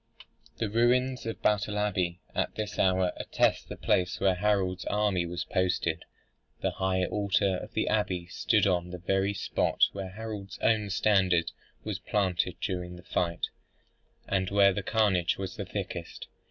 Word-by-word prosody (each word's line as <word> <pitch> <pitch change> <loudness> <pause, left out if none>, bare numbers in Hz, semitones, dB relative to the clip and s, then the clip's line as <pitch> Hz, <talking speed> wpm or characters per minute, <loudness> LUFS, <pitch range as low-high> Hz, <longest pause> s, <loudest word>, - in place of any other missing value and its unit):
The 110 - -1
ruins 120 +3 +2
of 115 - -5
Battle 105 0 +1
Abbey 90 -4 0
at - - -1
this 105 -1 -4
hour 95 -1 +3
attest - - +1
the - - -6
place 90 0 +1
where 95 - +3
Harold's 95 -1 +1
army 100 -4 +1
was 85 0 -3
posted. 90 -3 0 0.6
The - - +1
high 95 -1 0
altar 100 -1 +1
of - - -9
the - - 0
abbey 95 -5 0
stood 105 +4 +2
on 90 -2 +1
the 90 - -6
very 95 +3 0
spot - - 0
where 95 -1 -5
Harold's 105 -1 -7
own 110 -2 +2
standard 95 -4 +3 0.3
was - - -3
planted 95 -3 0
during 90 -2 -3
the 90 - -12
fight, 85 -2 -1 0.8
and 95 -1 0
where 100 -1 +5
the 100 - -2
carnage 95 -4 +2
was 95 -1 -5
the - - -4
thickest. - - -5
95 Hz, 155 wpm, -29 LUFS, 90-105 Hz, 0.8 s, where